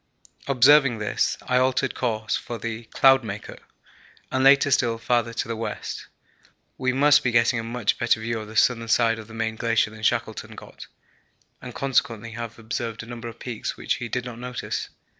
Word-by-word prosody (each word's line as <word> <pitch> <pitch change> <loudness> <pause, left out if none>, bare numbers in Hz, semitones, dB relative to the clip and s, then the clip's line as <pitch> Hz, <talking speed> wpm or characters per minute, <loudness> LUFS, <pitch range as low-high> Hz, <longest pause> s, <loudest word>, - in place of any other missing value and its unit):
Observing 135 -1 +5
this, 105 -1 -1
I 125 - +1
altered 130 +1 +1
course 110 -3 -1
for 120 - -5
the 115 0 -5
'Cloudmaker' 115 -6 +2 0.7
and 130 - +1
later 140 +1 +6
still 120 -3 +2
farther 115 +1 0
to 115 - -3
the 115 - -3
west. 115 - -5 0.7
We 130 -1 0
must 145 +3 +4
be 125 - +2
getting 115 +1 +3
a - - -4
much 115 -2 -1
better 120 -1 +2
view 115 +1 -3
of 110 - -8
the 110 - -11
southern 115 0 +2
side 115 0 +2
of 110 - -10
the 115 - -12
main 110 0 -2
glacier 115 -2 +1
than 110 0 -12
Shackleton 115 0 -1
got, - - -12 0.7
and - - -9
consequently 115 -4 0
have 115 0 -7
observed 115 0 -4
a - - -10
number 120 0 -7
of 115 0 -9
peaks 120 -2 -5
which - - -1
he 120 - -6
did 125 +2 -2
not 120 -2 -8
notice. 125 0 -4
115 Hz, 185 wpm, -24 LUFS, 115-125 Hz, 0.7 s, later